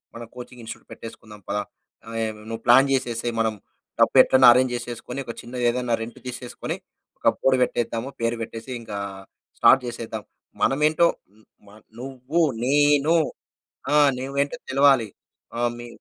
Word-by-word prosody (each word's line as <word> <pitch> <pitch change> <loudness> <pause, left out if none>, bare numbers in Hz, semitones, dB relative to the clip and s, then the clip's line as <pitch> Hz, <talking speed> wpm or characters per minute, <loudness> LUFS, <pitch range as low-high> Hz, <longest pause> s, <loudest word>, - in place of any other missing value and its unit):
మనం 115 - -7
coaching 125 0 -10
institute 115 - -9
పెట్టేసుకుందాం 110 -2 -11
పదా! 105 +1 -1 0.4
ఆహ్, 115 -1 -3
నువ్వు 115 0 -5
ప్లాన్ 135 +3 +7
చేసేసేయ్ 120 -2 -1
మనం 110 -1 +1 0.5
డబ్బు - - +4
ఎట్లైనా 130 -1 +6
అరేంజ్ 130 0 +2
చేసేసుకొని 120 +2 -6
ఒక 115 - -5
చిన్నది 125 +1 -6
ఏదన్నా 125 0 -1
రెంట్ 115 +1 -7
తీసేసుకొని, 125 -1 -5 0.4
ఒక - - -2
బోర్డ్ 130 -1 +2
పెట్టేద్దాము 120 0 -1
పేరు 115 0 0
పెట్టేసి 115 +2 -7
ఇంకా 105 -3 -7 0.6
స్టార్ట్ 135 -1 +6
చేసేద్దాం. 115 -3 -6 0.4
మనమేంటో 155 +4 +3 0.2
హ్మ్, 105 +3 -26 0.2
మ - - -15 0.3
నువ్వు 135 +5 -2 0.2
నేను 145 +2 +3 0.8
ఆ! - - +3 0.2
నువ్వేంటో 140 +2 -2
తెలవాలి. 135 -4 +4 0.5
ఆహ్, 120 0 +1
మీ 120 - -8
120 Hz, 140 wpm, -24 LUFS, 115-135 Hz, 0.8 s, ప్లాన్